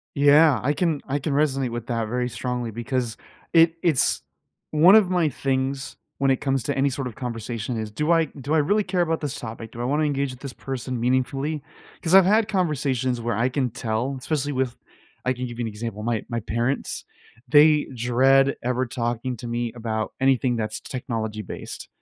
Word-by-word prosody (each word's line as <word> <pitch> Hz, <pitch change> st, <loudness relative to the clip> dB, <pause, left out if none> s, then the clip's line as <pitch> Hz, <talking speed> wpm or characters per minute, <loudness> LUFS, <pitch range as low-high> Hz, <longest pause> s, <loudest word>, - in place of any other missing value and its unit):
Yeah, 145 Hz, -2 st, +6 dB
I 140 Hz, -, +2 dB
can 160 Hz, -2 st, 0 dB
I 140 Hz, +1 st, -1 dB
can 145 Hz, +1 st, -3 dB
resonate 135 Hz, -4 st, +1 dB
with 120 Hz, -1 st, -5 dB
that 115 Hz, -3 st, -1 dB
very 125 Hz, +1 st, -1 dB
strongly 125 Hz, -1 st, -3 dB
because 120 Hz, +1 st, -2 dB, 0.4 s
it 165 Hz, 0 st, +6 dB
it's 155 Hz, -7 st, +2 dB, 0.5 s
One 165 Hz, +6 st, +7 dB
of 195 Hz, -4 st, +4 dB
my 175 Hz, -4 st, +2 dB
things 135 Hz, +1 st, -2 dB, 0.2 s
when 135 Hz, -1 st, +2 dB
it 130 Hz, -, +2 dB
comes 135 Hz, -3 st, 0 dB
to -, -, -1 dB
any 135 Hz, +1 st, +2 dB
sort 130 Hz, 0 st, -4 dB
of 115 Hz, -, -10 dB
conversation 115 Hz, -1 st, -4 dB
is, 110 Hz, -1 st, -4 dB
do 150 Hz, +9 st, -1 dB
I 165 Hz, -1 st, +4 dB
do 140 Hz, +1 st, -4 dB
I 160 Hz, -, +4 dB
really 205 Hz, +9 st, +3 dB
care 180 Hz, -1 st, +1 dB
about 165 Hz, -1 st, 0 dB
this 145 Hz, -3 st, -4 dB
topic? 115 Hz, -1 st, -7 dB
Do 120 Hz, -, -8 dB
I -, -, -1 dB
wanna 145 Hz, +4 st, +1 dB
engage 140 Hz, -2 st, 0 dB
with 125 Hz, -, -12 dB
this 140 Hz, -3 st, -6 dB
person 130 Hz, -2 st, -4 dB
meaningfully? 135 Hz, +4 st, 0 dB, 0.4 s
'Cause 165 Hz, -, -1 dB
I've 190 Hz, -2 st, +8 dB
had 215 Hz, +2 st, +3 dB
conversations 135 Hz, -, 0 dB
where 115 Hz, -2 st, -1 dB
I 120 Hz, +3 st, +2 dB
can 130 Hz, -2 st, 0 dB
tell, 120 Hz, +3 st, -2 dB
especially 145 Hz, +1 st, -2 dB
with 130 Hz, -2 st, -1 dB, 0.5 s
I 130 Hz, -, +2 dB
can 125 Hz, +1 st, -4 dB
give 120 Hz, 0 st, -8 dB
you 120 Hz, -, -1 dB
an -, -, -2 dB
example, 105 Hz, 0 st, -6 dB
my 115 Hz, -1 st, -1 dB
my 115 Hz, -1 st, -2 dB
parents, 120 Hz, +5 st, -2 dB, 0.4 s
they 150 Hz, +1 st, +6 dB
dread 135 Hz, +3 st, +3 dB
ever 125 Hz, +1 st, 0 dB
talking 120 Hz, 0 st, -2 dB
to 120 Hz, -, -7 dB
me 120 Hz, -1 st, -2 dB
about 110 Hz, -2 st, -3 dB
anything 130 Hz, -2 st, +2 dB
that's 110 Hz, -1 st, -3 dB
technology-based, 110 Hz, -5 st, -5 dB
130 Hz, 195 wpm, -24 LUFS, 120-145 Hz, 0.5 s, I've